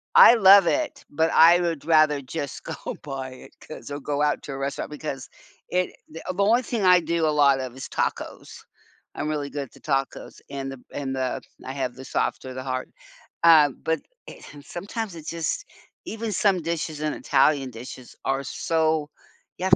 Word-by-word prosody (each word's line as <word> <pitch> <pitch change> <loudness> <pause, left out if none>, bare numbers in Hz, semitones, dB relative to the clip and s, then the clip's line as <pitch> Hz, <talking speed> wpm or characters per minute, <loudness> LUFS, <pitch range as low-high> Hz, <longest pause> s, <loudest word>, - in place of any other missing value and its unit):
I 240 - +10
love 195 -3 +8
it, 305 -2 -1
but 160 +2 +1
I 170 +2 +7
would 165 -4 -2
rather 155 -3 +4
just 135 0 -5
go 160 - -6
buy 135 -3 -5
it, 130 - -14
'cause 155 - -10
I'll 145 - -4
go 145 +1 -2
out 150 0 +1
to 145 - -7
a - - -5
restaurant, 140 +2 -4
because 145 -3 -5 0.4
it 180 0 0
the 160 +1 -9
the 200 - 0
only 235 +5 +4
thing 230 -4 -2
I 180 -1 +7
do 170 -1 0
a - - +3
lot 140 -2 +5
of 130 -1 -6
is 130 - -8
tacos. - - -3 0.6
I'm 150 - -3
really 145 -2 -2
good 145 -1 -4
at - - -21
the - - -17
tacos, 135 -2 -3
and 135 -1 -4
the 135 - -8
b - - -21
and 135 -2 -3
the 130 -1 -2 0.2
I 130 - -4
have 130 -3 -3
the 130 0 -10
soft - - -2
or 130 - -6
the 130 - -5
hard, 130 -1 -4 0.5
uh, 155 -3 +8
but, 160 0 0 0.3
eh - - -11
and 145 -1 -12
sometimes 200 +1 -5
it's 160 -1 -7
just 170 - -2 0.4
even 225 0 -4
some 190 -1 +2
dishes 160 -2 -3
in 155 -1 -1
Italian 135 -4 +2
dishes 120 +2 -10
are 135 +1 0
so 160 -2 0 0.5
you 185 - -3
have - - +6
150 Hz, 200 wpm, -25 LUFS, 135-170 Hz, 0.6 s, I